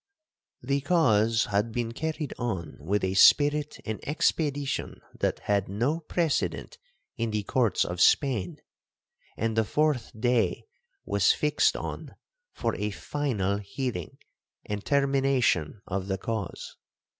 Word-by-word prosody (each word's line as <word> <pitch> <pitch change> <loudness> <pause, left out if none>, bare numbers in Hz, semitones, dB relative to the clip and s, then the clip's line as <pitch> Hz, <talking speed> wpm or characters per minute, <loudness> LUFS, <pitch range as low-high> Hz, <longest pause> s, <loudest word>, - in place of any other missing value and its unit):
'The 140 +2 0
cause 115 -8 +3
had 105 +3 0
been 115 0 -2
carried 155 +2 -3
on 95 -11 -3
with 95 +7 -1
a 95 0 0
spirit 145 +8 +5
and 110 -1 -3
expedition 145 -2 -1 0.2
that - - 0
had 100 -2 0
no 120 +11 0
precedent 165 -1 -2 0.4
in 115 -1 -1
the 105 -1 -2
courts 115 +1 +1
of 90 0 -3
Spain, 120 -11 +3 0.8
and 115 0 -1
the 110 - +3
fourth 150 0 0
day 120 0 +1 0.4
was 450 - +3
fixed - - +2
on - - -6 0.4
for - - -2
a 105 +1 -1
final 105 -3 -2
hearing 105 - -5 0.5
and 105 -1 -4
termination 135 - +1
of 95 0 -3
the 95 -1 -1
cause. 110 -4 -5
115 Hz, 125 wpm, -27 LUFS, 100-140 Hz, 0.8 s, spirit